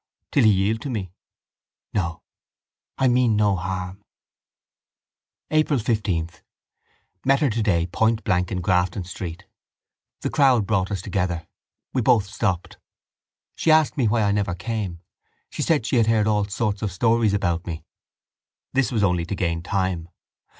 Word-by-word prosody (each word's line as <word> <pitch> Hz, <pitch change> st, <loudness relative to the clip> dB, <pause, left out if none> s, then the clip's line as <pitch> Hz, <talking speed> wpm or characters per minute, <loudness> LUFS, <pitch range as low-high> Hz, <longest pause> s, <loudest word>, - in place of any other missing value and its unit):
Till 135 Hz, -, +4 dB
he -, -, +7 dB
yield 105 Hz, +3 st, +1 dB
to 140 Hz, -, -5 dB
me? 100 Hz, -8 st, -4 dB, 0.8 s
No. 85 Hz, -4 st, -2 dB, 0.7 s
I 130 Hz, -, +3 dB
mean 120 Hz, -2 st, +3 dB
no 105 Hz, -2 st, +3 dB
harm. 95 Hz, +2 st, -5 dB, 1.5 s
April 155 Hz, -2 st, +3 dB
15. 105 Hz, -8 st, 0 dB, 1.0 s
Met 135 Hz, +1 st, +3 dB
her 145 Hz, -5 st, +2 dB
today 105 Hz, -7 st, +1 dB
point 110 Hz, +5 st, +1 dB
blank 90 Hz, -3 st, 0 dB
in 90 Hz, -2 st, -2 dB
Grafton 90 Hz, +3 st, +1 dB
Street. 90 Hz, +1 st, -7 dB, 0.8 s
The -, -, -2 dB
crowd 130 Hz, -7 st, +4 dB
brought 95 Hz, -3 st, 0 dB
us 95 Hz, -3 st, -3 dB
together. 90 Hz, -4 st, -2 dB, 0.5 s
We 130 Hz, -, +1 dB
both 110 Hz, -2 st, +4 dB
stopped. 95 Hz, -3 st, -2 dB, 0.8 s
She -, -, 0 dB
asked 155 Hz, -1 st, +4 dB
me 130 Hz, -7 st, +2 dB
why 110 Hz, +1 st, +2 dB
I 100 Hz, -, +2 dB
never 100 Hz, -4 st, 0 dB
came, 90 Hz, -2 st, -4 dB, 0.5 s
said 150 Hz, -8 st, 0 dB
she 125 Hz, -, +1 dB
had 115 Hz, -2 st, +3 dB
heard 110 Hz, -2 st, +3 dB
all 105 Hz, -1 st, +2 dB
sorts 100 Hz, 0 st, -2 dB
of 105 Hz, -3 st, -2 dB
stories 115 Hz, +1 st, +2 dB
about 85 Hz, -4 st, -1 dB
me. 80 Hz, -2 st, -5 dB, 0.9 s
This 135 Hz, -1 st, +1 dB
was 110 Hz, -4 st, +1 dB
only 90 Hz, -3 st, +1 dB
to 100 Hz, -, -3 dB
gain 85 Hz, -2 st, -1 dB
time. 95 Hz, -2 st, -2 dB
100 Hz, 150 wpm, -23 LUFS, 90-115 Hz, 1.5 s, he